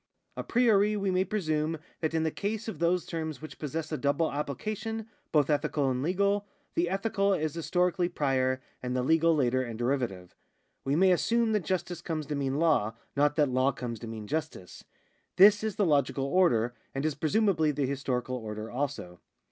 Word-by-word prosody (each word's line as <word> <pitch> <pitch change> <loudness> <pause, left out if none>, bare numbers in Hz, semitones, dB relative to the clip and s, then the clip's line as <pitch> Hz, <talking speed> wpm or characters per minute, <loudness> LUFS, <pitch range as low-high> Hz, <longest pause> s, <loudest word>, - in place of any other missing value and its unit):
A - - -3
'priori 215 -3 +3
we 195 -1 0
may 185 0 +2
presume 160 -6 -1 0.2
that 160 0 -1
in 160 - +1
the 160 - 0
case 210 +5 -3
of 185 -9 -5
those 170 +1 +1
terms 160 -2 -4
which 155 - -10
possess 155 +1 -4
a 155 - -2
double 145 +3 +1
application, 215 - -4 0.2
both 150 -3 +3
ethical 145 -2 +1
and 125 0 -1
legal, 200 +5 +1 0.3
the 170 0 +1
ethical 195 0 +1
is 155 -3 -2
historically 180 +1 0
prior, 130 -5 0 0.2
and 125 0 -3
the 125 - 0
legal 165 +3 +3
later 130 -3 +2
and 120 -3 -5
deiivative. 120 -8 -2 0.5
We 135 +1 0
may 185 +3 +5
assume 230 +5 +2
that 210 -5 0
justice 180 -2 -2
comes 160 -3 -3
to 145 +1 -3
mean 135 -1 -1
law, 145 -10 +2 0.2
not 145 +1 +3
that 150 -3 +3
law 130 +2 +2
comes 115 -3 -5
to 115 - -7
mean 110 -1 -6
justice. 145 - -5 0.5
This 205 +2 +7
is 215 -3 -2
the 205 - +2
logical 140 -3 +1
order, 130 -8 +2 0.2
and 135 +2 -1
is 155 - +1
presumably 160 +1 +2
the 145 -1 0
historical 130 -2 -2
order 110 -1 -6
also. 120 -10 -4
155 Hz, 185 wpm, -29 LUFS, 135-185 Hz, 0.5 s, This